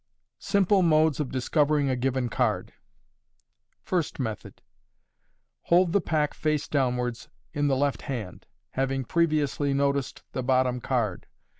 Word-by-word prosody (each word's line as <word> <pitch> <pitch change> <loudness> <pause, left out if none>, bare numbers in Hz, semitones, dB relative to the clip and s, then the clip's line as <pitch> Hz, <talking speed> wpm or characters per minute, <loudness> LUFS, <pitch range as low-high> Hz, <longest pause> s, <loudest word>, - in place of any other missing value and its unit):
Simple 200 -1 +2
Modes 155 -3 +3
of 145 -4 -1
Discovering 145 +2 +1
a - - +1
given 130 0 -1
Card. - - -1 1.1
First 175 -6 -2
Method. 110 -5 -5 0.5
— - - -48
Hold 175 0 +4
the 200 - +3
pack 150 -3 0
face 150 -2 -1
downwards 125 -4 -1 0.2
in 145 -2 0
the 135 -2 +2
left 140 0 0
hand, 115 - -6 0.2
having 135 0 -1
previously 150 -3 +1
noticed 140 -1 -1
the 130 - -3
bottom 130 -1 +1
card. 115 -9 -1
140 Hz, 130 wpm, -26 LUFS, 130-155 Hz, 1.1 s, Hold